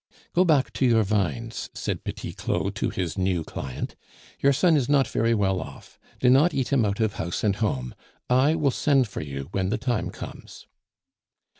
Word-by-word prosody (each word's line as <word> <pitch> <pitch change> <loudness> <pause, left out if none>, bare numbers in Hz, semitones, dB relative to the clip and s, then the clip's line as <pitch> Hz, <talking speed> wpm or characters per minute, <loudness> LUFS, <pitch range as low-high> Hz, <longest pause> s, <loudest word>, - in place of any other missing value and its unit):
"Go 180 - +5
back 150 -6 +2
to 135 - +1
your 115 -2 +4
vines," 110 +3 -2
said - - -3
Petit - - -5
Claud - - -2
to - - -1
his 90 +1 -3
new 90 -3 +1
client. 65 -4 -6 0.4
"Your 140 - +4
son 165 +4 +4
is 135 -4 +1
not 140 -2 +4
very 115 +1 +1
well 95 -3 +1
off; - - -11 0.2
do 125 - +2
not 140 +7 +5
eat 135 0 -1
him 125 -5 +3
out 100 +2 -1
of 110 -3 0
house 85 +1 -3
and 100 -2 +2
home. 65 - -1 0.3
I 130 +5 +4
will 150 -4 +2
send 135 -2 +2
for - - -6
you 70 -1 -6
when 95 -1 -1
the 110 - 0
time 120 -1 -1
comes." - - -10
115 Hz, 190 wpm, -25 LUFS, 95-135 Hz, 0.4 s, Go